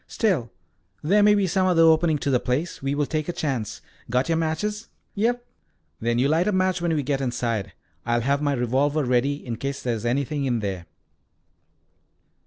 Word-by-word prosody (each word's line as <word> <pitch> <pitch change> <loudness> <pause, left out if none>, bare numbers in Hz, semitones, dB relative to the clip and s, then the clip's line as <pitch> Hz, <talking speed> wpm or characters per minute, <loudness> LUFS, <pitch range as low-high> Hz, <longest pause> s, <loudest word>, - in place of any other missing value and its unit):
"Still, 165 - 0 0.5
there 200 +7 +4
may 210 0 +6
be 200 -1 +2
some 185 +1 +1
other 170 -3 +4
opening 160 -1 +4
to 140 - -1
the 125 - +3
place. 140 +9 -2
We 135 +1 -1
will 145 0 +1
take 155 +2 -2
a - - +2
chance. 135 - -3 0.3
Got 125 +5 +1
your 165 - +3
matches?" 210 +8 -2 0.3
"Yes." 230 +4 +1 0.6
"Then 120 +1 0
you 130 +3 +3
light 165 +6 +2
a - - +3
match 185 -2 +1
when 170 -2 +1
we 145 - 0
get 135 0 -1
inside. 115 -6 -2 0.3
I'll 120 0 +1
have 140 +4 +1
my 145 -1 +1
revolver 135 +4 +1
ready 130 +3 0
in 115 -3 -4
case 140 +2 -4
there 120 - 0
is 110 - -4
anything 140 +4 -1
in 120 -3 0
there." 95 -4 -4
145 Hz, 195 wpm, -24 LUFS, 125-170 Hz, 0.6 s, may